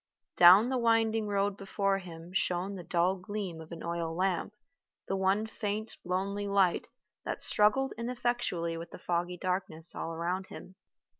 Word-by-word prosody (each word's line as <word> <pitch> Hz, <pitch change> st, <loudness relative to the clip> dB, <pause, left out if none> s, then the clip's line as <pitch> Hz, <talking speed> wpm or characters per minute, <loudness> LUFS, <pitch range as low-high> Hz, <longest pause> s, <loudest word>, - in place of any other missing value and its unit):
Down 185 Hz, +7 st, +8 dB
the 260 Hz, -1 st, 0 dB
winding 225 Hz, -2 st, +2 dB
road 200 Hz, 0 st, 0 dB
before 195 Hz, 0 st, 0 dB
him 170 Hz, -1 st, -10 dB
shone 185 Hz, +1 st, 0 dB
the 190 Hz, -, -6 dB
dull 175 Hz, +2 st, +1 dB
gleam 190 Hz, -3 st, -5 dB
of 160 Hz, -, -12 dB
an 170 Hz, -, -7 dB
oil 170 Hz, -1 st, -2 dB
lamp, 185 Hz, +1 st, 0 dB, 0.6 s
the 195 Hz, -, 0 dB
one 195 Hz, +3 st, +2 dB
faint 215 Hz, 0 st, -4 dB
lonely 200 Hz, +3 st, -2 dB
light 195 Hz, -3 st, +2 dB, 0.4 s
that -, -, -3 dB
struggled 265 Hz, +6 st, +3 dB
ineffectually 235 Hz, -9 st, -1 dB
with 165 Hz, +1 st, -7 dB
the -, -, -10 dB
foggy 175 Hz, 0 st, -2 dB
darkness 180 Hz, -3 st, -2 dB
all 165 Hz, 0 st, -4 dB
round 180 Hz, +3 st, -2 dB
him. 185 Hz, -, -10 dB
190 Hz, 155 wpm, -31 LUFS, 175-210 Hz, 0.6 s, Down